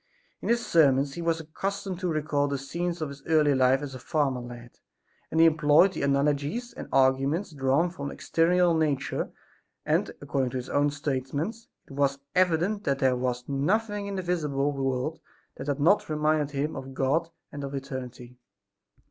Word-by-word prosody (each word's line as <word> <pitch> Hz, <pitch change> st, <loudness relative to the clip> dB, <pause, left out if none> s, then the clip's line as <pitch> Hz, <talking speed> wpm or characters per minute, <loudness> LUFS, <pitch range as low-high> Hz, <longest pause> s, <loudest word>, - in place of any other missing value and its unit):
In -, -, -4 dB
his 235 Hz, 0 st, +2 dB
sermons 140 Hz, -4 st, +3 dB
he 170 Hz, -, -5 dB
was 165 Hz, -1 st, 0 dB
accustomed 190 Hz, +4 st, -4 dB
to 185 Hz, -, -2 dB
recall 150 Hz, -3 st, 0 dB
the 140 Hz, 0 st, -1 dB
scenes 170 Hz, +5 st, -3 dB
of 150 Hz, -, -3 dB
his 140 Hz, 0 st, -10 dB
early 155 Hz, -3 st, +4 dB
life 130 Hz, +1 st, +3 dB
as 140 Hz, -2 st, -6 dB
a 130 Hz, -, -7 dB
farmer 140 Hz, -2 st, 0 dB
lad, 120 Hz, -1 st, -11 dB, 0.5 s
and 160 Hz, -, 0 dB
he 165 Hz, -, +8 dB
employed 160 Hz, +3 st, +5 dB
the -, -, -4 dB
analogies 145 Hz, -, 0 dB
and -, -, -8 dB
arguments 135 Hz, +7 st, +2 dB
drawn 140 Hz, +4 st, +1 dB
from 140 Hz, -6 st, -5 dB
external 175 Hz, +4 st, +2 dB
nature 145 Hz, -4 st, 0 dB, 0.6 s
and, -, -, +1 dB
according 135 Hz, -2 st, -1 dB
to 130 Hz, -, -4 dB
his 125 Hz, 0 st, -6 dB
own 145 Hz, +1 st, +2 dB
statements, 145 Hz, -, -3 dB, 0.2 s
it -, -, -17 dB
was 140 Hz, 0 st, +1 dB, 0.2 s
evident 185 Hz, +3 st, +2 dB
that 140 Hz, -6 st, +1 dB
there 130 Hz, -2 st, +2 dB
was 125 Hz, -1 st, -2 dB
nothing 205 Hz, +9 st, 0 dB
in 200 Hz, -, -4 dB
the 190 Hz, -, -3 dB
visible 150 Hz, -5 st, 0 dB
world 135 Hz, +2 st, -2 dB, 0.4 s
that 130 Hz, -, -7 dB
had 145 Hz, 0 st, -1 dB
not 170 Hz, +7 st, +3 dB
reminded 155 Hz, -1 st, +1 dB
him 145 Hz, +1 st, -2 dB
of 135 Hz, 0 st, -7 dB
God 155 Hz, +6 st, +1 dB, 0.2 s
and 145 Hz, 0 st, -6 dB
of 140 Hz, 0 st, -5 dB
eternity. 125 Hz, -2 st, -7 dB
145 Hz, 175 wpm, -27 LUFS, 135-170 Hz, 0.6 s, he